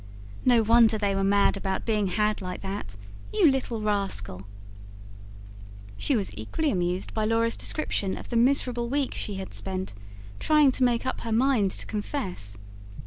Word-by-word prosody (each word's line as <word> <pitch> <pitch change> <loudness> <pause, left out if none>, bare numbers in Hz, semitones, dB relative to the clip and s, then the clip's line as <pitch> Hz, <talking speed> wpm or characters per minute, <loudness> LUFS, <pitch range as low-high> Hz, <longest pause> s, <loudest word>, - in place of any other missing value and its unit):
"No 240 -3 +5
wonder 225 0 +5
they 205 -2 0
were 195 0 0
mad 200 +1 +3
about 190 -1 -3
being 210 -3 +1
had 210 +3 0
like 180 -1 -5
that. 190 - -5 0.4
You 370 -9 +5
little 240 -4 -2
rascal!" 190 - -2 1.5
She 275 - 0
was 200 - -1
equally 280 - -1
amused 180 0 -2
by 220 - -1
Laura's 230 +1 +1
description 200 -10 -2
of - - -9
the 240 - -3
miserable 240 -1 +2
week 275 0 0
she 205 - -4
had 190 0 -6
spent, 190 - -4 0.5
trying 300 -3 +4
to 260 - 0
make 240 -1 +2
up 260 - -2
her 230 - -4
mind 230 -3 +3
to - - -5
confess. 190 - -4
215 Hz, 160 wpm, -26 LUFS, 190-245 Hz, 1.5 s, No